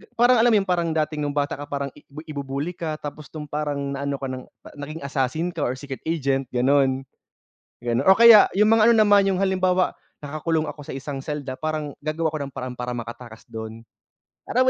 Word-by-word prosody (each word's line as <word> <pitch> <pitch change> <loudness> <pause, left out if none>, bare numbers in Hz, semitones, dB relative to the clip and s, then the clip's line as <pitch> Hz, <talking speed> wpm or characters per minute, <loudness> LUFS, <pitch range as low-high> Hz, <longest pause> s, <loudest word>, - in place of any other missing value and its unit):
parang 245 +1 +5
alam 235 +1 +5
’yon? 205 -2 +4
Parang 175 -2 +1
dati, 155 -1 -1
nung 145 -1 -2
bata 145 -1 -1
ka, 145 - -7
parang 140 -1 -3
ibi 150 +2 -12
ibubully 140 +2 -3
ka 165 -3 -4
tapos 150 -1 -8
nung 150 -1 -6
parang 150 0 -2 0.2
naano 140 0 -2
ka 135 0 -5
ng 130 0 -6 0.2
pa - - -11
naging 155 +3 -7
assassin 140 +4 -1
ka 170 - -8
or 125 - -1
secret 135 0 -7
agent, 135 -5 0
gano'n. 135 +1 +3 0.8
Gano 120 -1 0
o 190 - +7
kaya 230 -2 +9
yung 210 +1 +5
mga 225 0 +5
ano - - +6
naman, 205 -1 +5
yung 190 - 0
halimbawa, 185 -1 +2 0.3
nakakulong 155 +2 -1
ako 150 - -9
sa - - -7
isang 135 0 -5
selda 140 -2 -4
parang 155 -2 -3
gagawa 155 +2 -1
ako - - -1
ng - - -25
paraan 125 -1 -5
para 125 0 -4
makatakas 120 -1 -8
dun. 110 0 -8 0.6
Alam 255 - +3
145 Hz, 200 wpm, -23 LUFS, 135-165 Hz, 0.8 s, kaya